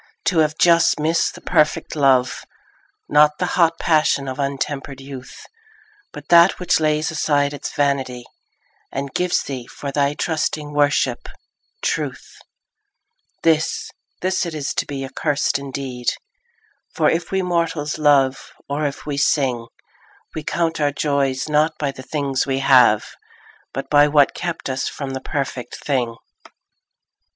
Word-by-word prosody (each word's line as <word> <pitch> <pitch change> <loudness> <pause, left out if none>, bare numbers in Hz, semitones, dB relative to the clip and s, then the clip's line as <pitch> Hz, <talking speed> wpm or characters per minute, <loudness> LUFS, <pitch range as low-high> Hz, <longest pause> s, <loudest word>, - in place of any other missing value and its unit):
To 175 - +2
have 155 -1 +2
just 170 -2 +4
missed 160 +2 +1
the - - -12
perfect 155 +1 +1
love, 135 -3 +2 0.6
Not 150 0 +4
the 180 - 0
hot 165 -2 +3
passion 155 -4 +2
of 130 +1 -5
untempered 140 0 -3
youth, 135 -2 -10 0.7
But 150 0 -11
that 170 +2 +6
which 180 - +2
lays 155 0 +1
aside 145 -2 +1
its 145 - -5
vanity 135 -4 -1 0.7
And 135 0 -4
gives 180 0 +1
thee, 130 -3 -6
for 140 - -6
thy 140 +1 +1
trusting 155 -2 -2
worship, 145 -4 +1 0.5
truth— - - -3 1.0
This, 160 -1 +1 0.3
this 185 +1 0
it 170 -3 -4
is 145 -2 -3
to - - -2
be 135 -1 -4
accursed 140 +1 -1
indeed; 135 -3 -6 0.9
For 155 -2 +2
if 170 +3 0
we 190 -1 0
mortals 165 -4 -1
love, 140 -3 +2
or 145 +1 -1
if 140 - -7
we 145 -2 -3
sing, 130 -5 +1 0.7
We 155 - -4
count 165 0 -1
our 145 -1 +2
joys 140 -2 0
not 155 +1 +1
by 145 -2 -1
the 135 - -11
things 140 -1 -2
we 135 -1 0
have, 125 -6 +5 0.7
But 135 - -5
by 145 0 +6
what 145 -2 +4
kept 170 -2 -4
us 130 -1 -2
from 140 -2 -6
the 130 0 -5
perfect 135 -4 -4
thing. 125 -5 -1
145 Hz, 145 wpm, -21 LUFS, 135-155 Hz, 1.0 s, that